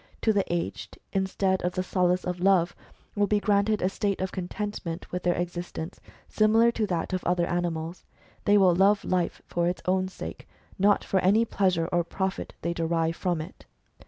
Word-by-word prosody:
To 220 - +4
the 200 -3 0
aged, 175 -1 -3 0.2
instead 190 0 +1
of 180 0 -1
the 185 - -1
solace 180 -1 +1
of 180 0 -3
Love, 180 -2 +3 0.4
will 205 -1 +2
be 210 +1 +2
granted 205 0 +2
a - - +4
state 200 0 -1
of 190 0 -2
contentment 180 -2 -5
with 180 - -2
their 175 -1 +1
existence, 175 0 -5 0.3
similar 225 +2 +4
to 220 -2 -1
that 175 -1 -2
of 185 - -1
other 175 0 +1
animals. 170 -1 -3 0.4
They 205 0 +5
will 185 -3 +5
love 195 +3 +3
life 180 -2 -1
for 170 0 0
its 180 - -2
own 185 0 +1
sake, 85 - -8 0.3
not 200 +1 +4
for 190 - +1
any 205 +5 +4
pleasure 185 -6 +1
or 175 -1 +2
profit 190 +3 -3
they 170 - 0
derive 165 0 0
from 175 -3 -1
it." 155 - -11
185 Hz, 185 wpm, -27 LUFS, 175-200 Hz, 0.4 s, They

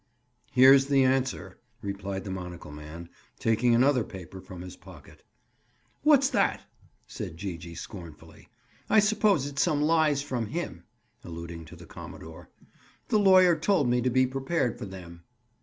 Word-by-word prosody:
"Here's 135 +1 +7
the 140 -1 +4
answer," 130 0 -1 0.2
replied 100 -1 -4
the 95 - -6
monocle 90 -4 -7
man, 75 +3 -9 0.3
taking 115 +2 +2
another 130 0 +3
paper 95 -1 -10
from 90 -1 -10
his 90 0 -9
pocket. - - -15 0.8
"What's 285 -3 +5
that?" - - +1 0.4
said 95 -8 -7
Gee 95 0 -4
gee 85 +1 -10
scornfully. 85 -7 -11 0.4
"I - - +4
suppose 210 -7 +3
it's 140 -1 -2
some 145 - +2
lies 155 -3 +2
from 125 -6 -3
him." 105 - -5 0.4
Alluding 85 -1 -8
to 80 - -12
the 85 0 -13
commodore. 80 +1 -11 0.6
"The 215 - +3
lawyer 185 -3 +6
told 155 -4 +1
me 125 0 +2
to 125 - +1
be 130 +1 +3
prepared 135 0 -2
for - - -5
them." 90 -3 -10
120 Hz, 150 wpm, -27 LUFS, 90-145 Hz, 0.8 s, Here's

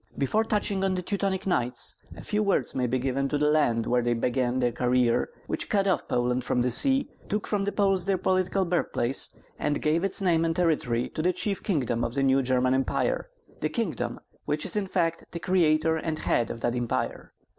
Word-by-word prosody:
Before 210 +11 +1
touching 205 -3 0
on 190 -1 +1
the 180 - -3
Teutonic 195 0 -1
Knights, 125 -10 +1 0.2
a - - -9
few 210 0 0
words 200 -2 +1
may 125 -1 0
be 130 +2 0
given 135 +2 -1
to 145 - 0
the 150 +1 +2
land 120 -7 +2
where 125 0 +2
they 120 0 +1
began 125 +1 0
that 125 -2 +1
career 125 0 +2 0.2
which - - -2
cut 200 -3 +2
off 190 - 0
Poland 125 +1 0
from 125 - +1
the 125 - +1
sea, 270 - +2 0.2
took 210 0 -1
from 200 -2 -1
the 205 - 0
Poles 195 -3 +1
their 195 -1 +1
political 185 +1 +1
birthplace, 155 -7 0 0.3
and 145 - 0
gave 155 +3 +1
its 195 - +2
name 170 -4 +2
and 165 0 0
territory 145 -9 +1
to 155 - -4
the 180 +3 +2
chief 200 0 -2
kingdom 125 - 0
of 120 - -3
the 140 - +1
new 135 0 +4
German 130 0 +2
Empire, - - 0 0.3
the - - -1
kingdom - - -3 0.3
which - - -1
is - - -3
in 205 -2 0
fact 165 -3 0
the 170 - -4
creator 160 -3 +2
and 160 0 -3
head 120 -6 0
of 115 - -6
that 120 - 0
Empire. 120 -1 -3
155 Hz, 210 wpm, -27 LUFS, 125-190 Hz, 0.3 s, new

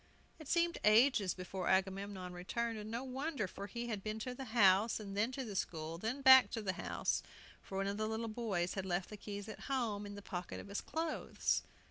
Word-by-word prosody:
It 310 - -10
seemed 340 +1 +2
ages 215 -3 +5
before 185 0 -4
Agamemnon 190 -1 0
returned, 225 +6 -2
and 210 +1 -7
no 235 +3 -3
wonder; 270 -3 -2
for 200 +2 -7
he 235 +4 -4
had 210 -3 -2
been 215 0 -3
to 250 +3 -3
the 265 +1 -6
house, 220 -2 +4
then 205 +3 -1
to 265 0 -3
the 210 -3 -6
school, 165 -2 -3
then 245 +8 -3
back 260 -1 +9
to 225 - -2
the 190 -2 0
house, - - -1 0.4
for 190 - -6
one 195 - 0
of 200 +1 -2
the 215 0 0
little 220 +1 -2
boys 215 -6 -1
had 195 - -2
left 180 +2 -1
the - - -5
keys 205 0 -6
at 215 - -7
home, 220 -6 -1
in 205 - -7
the 205 - -9
pocket 180 -2 -5
of - - -9
his 200 - -2
clothes. 320 -1 -1
210 Hz, 215 wpm, -36 LUFS, 195-240 Hz, 0.4 s, back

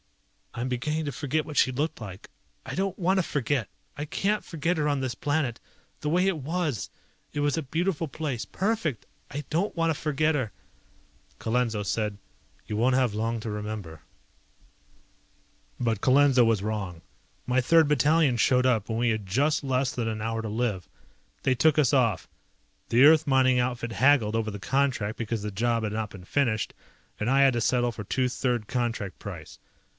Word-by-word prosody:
"I'm 120 +2 -3
beginning 150 +5 -2
to 145 - -2
forget 145 +3 -1
what 150 - -8
she 130 - +4
looked 145 +1 -2
like. 100 -2 -9 0.4
I - - -6
don't 195 0 -1
want 190 +1 +2
to - - +2
forget! 140 -6 -1 0.3
I 145 - -4
can't 200 +7 -1
forget 165 +2 -1
her 150 -1 +1
on 145 -1 +1
this 130 -3 -2
planet. 145 -3 -1 0.4
The 150 - -1
way 180 +4 +3
it 185 -5 0
was! 150 - -2 0.4
It - - -4
was 145 -1 +1
a 165 - -1
beautiful 165 +3 -1
place, 140 -6 -3
perfect! 190 - -2 0.2
I 145 +1 -5
don't 175 +7 0
want 165 0 +2
to 155 - -4
forget 155 +1 +1
her!" 125 -7 -1 0.9
Colenso 115 -2 0
said, 105 0 -2 0.5
"You 105 - -4
won't 125 +3 +3
have 125 -5 +2
long 115 +2 -1
to 110 - -5
remember." 105 -6 -5 1.8
But 115 -4 0
Colenso 135 -1 +5
was 115 -4 +2
wrong. 100 -6 -3 0.4
My 130 +1 +2
Third 160 +4 +5
Battalion 150 -1 +3
showed 125 +2 +3
up 115 -5 +1
when 110 - -1
we 120 +1 +2
had 110 -2 -1
just 140 +12 +1
less 130 -1 0
than 120 -2 -2
an 110 -1 -3
hour 115 +1 -2
to 110 - -5
live. 105 -4 -2 0.5
They 130 - +2
took 155 +3 +3
us 145 -4 +3
off. 115 -8 +2 0.6
The 125 +4 +6
Earth 155 +1 +6
mining 130 -2 +4
outfit 120 -2 -2
haggled 125 -5 +3
over 110 -1 -1
the 105 - -7
contract 125 0 0
because 115 -2 -3
the 105 - -3
job 115 +3 0
had 105 -1 -2
not 110 -1 -2
been 95 -3 -12
finished 115 -3 0 0.5
and 105 - 0
I 135 +1 +4
had 135 -2 +5
to 120 - -1
settle 120 0 +2
for 110 - -6
two 130 +5 0
third 125 -3 -1
contract 115 -6 -2
price. 85 -6 -9
125 Hz, 185 wpm, -27 LUFS, 110-145 Hz, 1.8 s, The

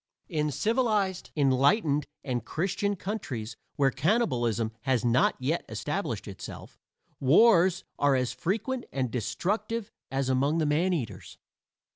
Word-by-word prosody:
In 150 -4 0
civilized, 215 - 0
enlightened 145 - +3 0.2
and 125 -4 -2
Christian 195 - -1
countries, 135 - -5 0.2
where 135 -1 +3
cannibalism 120 - +1
has 130 -3 +1
not 120 +2 +3
yet 145 +7 -1
established - - -3
itself, - - -9 0.4
wars 180 - +5 0.2
are 145 -1 +4
as 125 -1 0
frequent 230 +8 -2
and 130 -3 -1
destructive 205 - -2 0.2
as 135 -1 -1
among 135 +4 +2
the 160 - +1
maneaters. 150 - -1
150 Hz, 115 wpm, -28 LUFS, 130-195 Hz, 0.4 s, wars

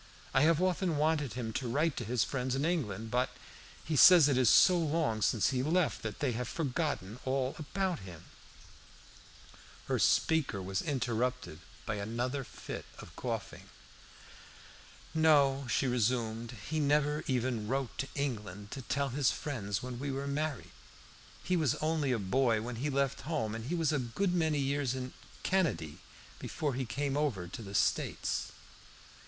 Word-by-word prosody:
I 130 - +4
have 160 +1 +4
often 180 -3 +1
wanted 150 -5 +1
him 115 -2 -4
to 130 +1 -2
write 150 +5 +1
to - - -2
his 120 +1 +1
friends 130 -1 -2
in 140 +3 0
England, 115 - -2
but 125 +1 +1 0.6
he 155 - -1
says 170 +1 +9
it 140 - +2
is 125 -2 +4
so 185 - +7
long 155 -9 0
since 110 +4 +2
he 130 -1 0
left 165 +4 +1
that 110 -2 -6
they 140 -4 +1
have 120 +2 -3
forgotten 140 - -2
all 130 0 -1
about 180 +3 -2
him." 90 -4 -10 1.6
Here - - 0
the - - -3
speaker 160 -10 +2
was 95 0 -2
interrupted 125 - -2 0.3
by 110 - -2
another 120 +6 -2
fit - - -8
of - - -12
coughing. - - -5 1.4
"No," 140 -4 +4
she - - +1
resumed, 120 -1 0
"he 155 +1 -1
never 150 +1 +2
even 125 -4 -1
wrote 135 +1 -2
to 135 - -1
England 105 -8 -4
to 135 - -5
tell 140 +2 -1
his 135 +1 +2
friends 105 -8 -3
when 125 -1 -5
we 140 +1 -3
were 135 +1 -3
married. 145 -1 -3 0.7
He 180 - +1
was 160 -5 +2
only 155 -3 0
a 125 - +2
boy 115 +3 +2
when 120 0 -5
he 140 +5 -1
left 140 -1 0
home, 140 -9 -2
and 115 0 -5
he 165 +7 -2
was 165 -2 +1
a 150 - +1
good 130 +10 -1
many 160 -4 +1
years 140 -2 0
in 130 0 -5 0.3
Canady 130 - 0 0.4
before 145 -3 -2
he 130 +1 -2
came 140 +4 -2
over 130 -12 -1
to 90 - -8
the 100 -2 -7
States." - - 0
135 Hz, 165 wpm, -32 LUFS, 115-150 Hz, 1.6 s, says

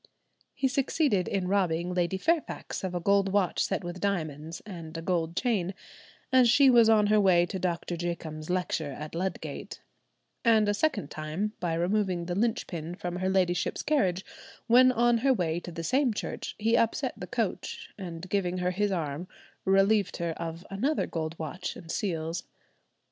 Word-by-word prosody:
He 270 0 +1
succeeded 265 - +1
in 190 -2 -1
robbing 180 -3 +1
Lady 180 +1 0
Fairfax 325 - -1
of 185 -1 -3
a - - 0
gold 200 +2 +2
watch 195 -3 +2
set - - -1
with 175 +1 -6
diamonds, 160 -4 -2
and 170 -5 -7
a - - -4
gold 170 -2 -1
chain, 200 -7 0 0.6
as 255 -2 +6
she 270 +2 +6
was 235 -2 +6
on 215 -2 +5
her 210 0 +4
way 175 -3 +5
to 190 +2 -5
Doctor 175 -1 -2
Jacomb's 165 -2 -5
lecture 180 -5 -1
at 150 +3 -7
Ludgate; 185 +3 -4 0.6
and 220 -3 +4
a 205 - +3
second 205 - 0
time 155 +8 -3
by 170 -2 -1
removing 180 0 0
the 175 - -3
linchpin 180 -6 -2
from 175 0 -4
her 185 +1 0
ladyship's 185 -2 +1
carriage 190 - +1 0.4
when 255 +2 +6
on 240 -1 +3
her 265 +2 +3
way 170 -4 0
to 175 - -8
the 165 0 -6
same 255 - +2
church, - - -5
he 225 +2 +2
upset 230 -1 +1
the - - -7
coach, - - -3
and 175 -2 -7
giving 185 -2 0
her 180 0 0
his 205 +2 0
arm, 165 -1 -3 0.4
relieved 195 +1 +3
her 170 -1 -1
of 165 +1 -6
another 265 +11 0
gold 160 0 -4
watch 160 +3 -5
and 165 -2 -8
seals. 165 -3 -2
185 Hz, 170 wpm, -28 LUFS, 170-210 Hz, 0.6 s, as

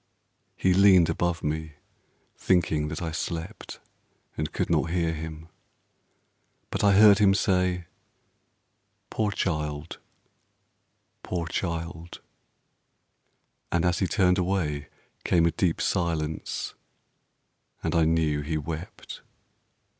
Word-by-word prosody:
He 95 - +2
leaned 95 -3 +6
above 85 0 -1
me, 80 0 -3 0.6
thinking 80 -5 +1
that 80 +3 -5
I 80 - -3
slept 80 0 -5 0.6
And 75 0 -3
could - - -1
not 85 - +1
hear 85 -1 0
him; 80 0 -7 1.2
but - - -2
I 100 -1 +5
heard 105 0 +7
him 100 -2 +5
say: 90 -2 +1 1.3
"Poor 110 -1 0
child, 75 -5 -3 1.2
poor 85 -2 -3
child": 85 0 -4 1.5
and 85 0 +1
as 90 0 +1
he 95 - +1
turned 90 +2 +2
away 85 -6 -1 0.4
Came 85 -2 +3
a 85 - +3
deep 85 -1 0
silence, 80 -4 -2 1.1
and - - -1
I 85 - +4
knew 80 -2 +1
he 80 +2 -2
wept. 80 +3 -7
85 Hz, 110 wpm, -26 LUFS, 80-90 Hz, 1.5 s, heard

